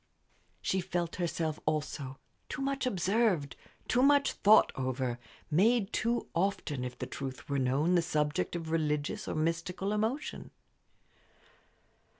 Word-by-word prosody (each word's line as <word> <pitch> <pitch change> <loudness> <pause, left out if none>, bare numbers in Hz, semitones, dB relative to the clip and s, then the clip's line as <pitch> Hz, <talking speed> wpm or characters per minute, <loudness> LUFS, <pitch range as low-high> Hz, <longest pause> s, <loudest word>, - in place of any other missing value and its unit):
She 190 - +1
felt 175 -2 -2
herself, 165 -3 -1
also, 150 -3 -2 0.3
too 270 - -3
much 275 -1 -1
observed, 190 - +1 0.3
too 245 - +3
much 285 +1 +5
thought 210 +2 +5
over, 130 -2 -2 0.3
made 210 +6 +3
too 235 +1 0
often, 165 -7 -1
if 125 0 -5
the - - -4
truth 135 0 -6
were 140 -2 0
known, 135 +7 +2
the 175 - +5
subject 150 0 0
of 165 -2 -4
religious 150 -2 -1
or - - -2
mystical 170 +5 -1
emotion. 225 +8 -2
165 Hz, 130 wpm, -31 LUFS, 150-205 Hz, 0.3 s, much